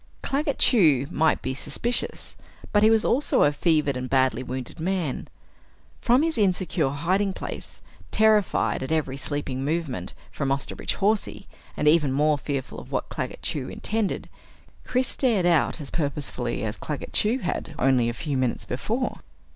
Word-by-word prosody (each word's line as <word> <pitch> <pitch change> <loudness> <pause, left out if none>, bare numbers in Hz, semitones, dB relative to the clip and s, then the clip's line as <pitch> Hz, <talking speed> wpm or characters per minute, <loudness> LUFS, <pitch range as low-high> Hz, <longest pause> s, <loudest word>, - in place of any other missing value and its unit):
Claggett 285 +1 -1
Chew 155 - +4
might 160 -1 +2
be 130 - -1
suspicious 240 - -1 0.4
but 205 - +5
he 215 - +6
was 225 -1 +4
also 275 +5 +3
a 145 - +4
fevered 150 -2 +2
and 130 0 -4
badly 130 -3 +2
wounded 130 +2 -6
man. 170 -5 -2 0.7
From 250 +4 +3
his 320 -7 0
insecure 185 -6 +1
hiding 185 +8 0
place, - - -7 0.3
terrified 215 -2 +3
at 130 - -4
every 150 -4 0
sleeping 140 -1 -3
movement 145 - -2 0.2
from 140 -2 -2
Osterbridge 135 0 -2
Hawsey, 210 +1 0 0.3
and 150 - +1
even 150 -3 +4
more 150 +2 +2
fearful 140 -2 -4
of - - -12
what - - -2
Claggett - - -5
Chew - - -2
intended, 220 -2 -2 0.6
Chris 255 0 +1
stared 225 -9 +1
out 170 -1 +3
as 145 -3 -6
purposefully 140 -6 -2
as 110 -1 -3
Claggett 150 -2 -5
Chew 220 +4 +2
had 180 - -4
only 125 -3 +3
a - - -2
few 145 +3 -3
moments 130 -2 -1
before. 230 - -2
155 Hz, 155 wpm, -25 LUFS, 135-210 Hz, 0.7 s, he